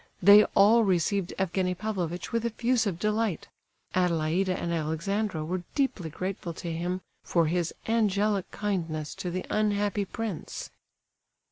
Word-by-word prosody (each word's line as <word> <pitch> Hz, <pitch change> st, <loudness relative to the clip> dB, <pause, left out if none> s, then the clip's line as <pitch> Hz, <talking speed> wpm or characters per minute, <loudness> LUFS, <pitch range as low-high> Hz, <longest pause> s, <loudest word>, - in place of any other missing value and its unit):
They 205 Hz, +3 st, +8 dB
all 220 Hz, +4 st, +6 dB
received 190 Hz, 0 st, +1 dB
Evgenie 185 Hz, 0 st, 0 dB
Pavlovitch 180 Hz, -4 st, -3 dB
with 230 Hz, -1 st, 0 dB
effusive 230 Hz, -4 st, 0 dB
delight; 210 Hz, -2 st, -1 dB, 0.4 s
Adelaida 180 Hz, +1 st, +1 dB
and 170 Hz, -, -2 dB
Alexandra 165 Hz, +3 st, -1 dB
were 180 Hz, +3 st, -2 dB
deeply 265 Hz, -, 0 dB
grateful 180 Hz, +1 st, -4 dB
to 170 Hz, -1 st, -5 dB
him 175 Hz, +3 st, -2 dB, 0.2 s
for 170 Hz, -2 st, +2 dB
his 170 Hz, +1 st, 0 dB, 0.2 s
"angelic 210 Hz, -3 st, +1 dB
kindness 165 Hz, -7 st, -3 dB
to 180 Hz, -, -5 dB
the 185 Hz, +1 st, -3 dB
unhappy 205 Hz, -1 st, +1 dB
prince." 220 Hz, -3 st, -5 dB
190 Hz, 125 wpm, -28 LUFS, 170-210 Hz, 0.4 s, They